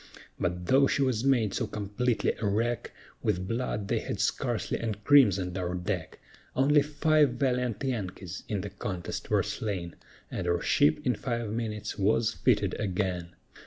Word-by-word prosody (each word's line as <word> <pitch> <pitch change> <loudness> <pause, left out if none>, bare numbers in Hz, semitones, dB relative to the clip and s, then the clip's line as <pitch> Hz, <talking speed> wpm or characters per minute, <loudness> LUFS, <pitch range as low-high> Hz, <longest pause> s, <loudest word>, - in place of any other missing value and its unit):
But 90 0 -2
though 135 +7 +5
she 140 - +1
was 125 -4 0
made 120 -7 +2
so - - -1
completely 105 +4 0
a 110 - 0
wreck, 115 +4 0 0.3
With 95 -3 0
blood 115 -3 -2
they - - +1
had - - -4
scarcely - - -1
encrimsoned 105 -5 +3
our 90 0 -2
deck; 90 -2 -3 0.4
Only 145 +3 +5
five 150 -1 +3
valiant 125 -4 0
Yankees 95 -7 -4
in 105 -3 -1
the 100 - -6
contest 95 -3 -5
were - - +3
slain, 95 -6 -4 0.4
And - - -3
our 85 0 +2
ship 75 -1 +2
in 125 - +3
five 120 -2 -3
minutes 110 -2 -4
was 110 +3 +2
fitted 105 -6 +2
again. 90 -3 -2
105 Hz, 155 wpm, -29 LUFS, 95-125 Hz, 0.4 s, though